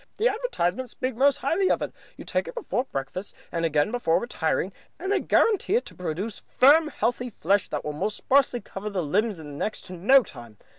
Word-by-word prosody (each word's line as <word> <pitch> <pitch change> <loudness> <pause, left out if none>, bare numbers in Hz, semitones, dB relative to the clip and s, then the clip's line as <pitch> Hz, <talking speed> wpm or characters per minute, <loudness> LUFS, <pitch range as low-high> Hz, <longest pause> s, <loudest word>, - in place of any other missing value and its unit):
The 445 - +3
advertisements 260 - -2
speak 255 -2 -3
most 275 +3 +4
highly 370 +6 +1
of - - +1
it. - - -5 0.2
You - - -9
take - - -1
it - - -8
before 275 - -2
breakfast 160 - -5 0.2
and 165 -1 -2
again 150 +3 +2
before 240 -9 +2
retiring, 190 -4 -1 0.2
and 380 +3 -3
they 405 - +3
guarantee 420 -2 +2
it 485 - +1
to - - -10
produce 180 +5 -4
firm, 300 +5 +5
healthy 245 -2 -1
flesh 195 +4 +2
on - - -2
the 150 - -3
most 180 +8 -2
sparsely 260 -3 +2
covered 200 +1 -7
limbs 195 +5 0
in 145 -3 -9
next 215 - -2
to 185 - -10
no 240 +10 +5
time. 120 - -12
220 Hz, 200 wpm, -26 LUFS, 170-275 Hz, 0.2 s, firm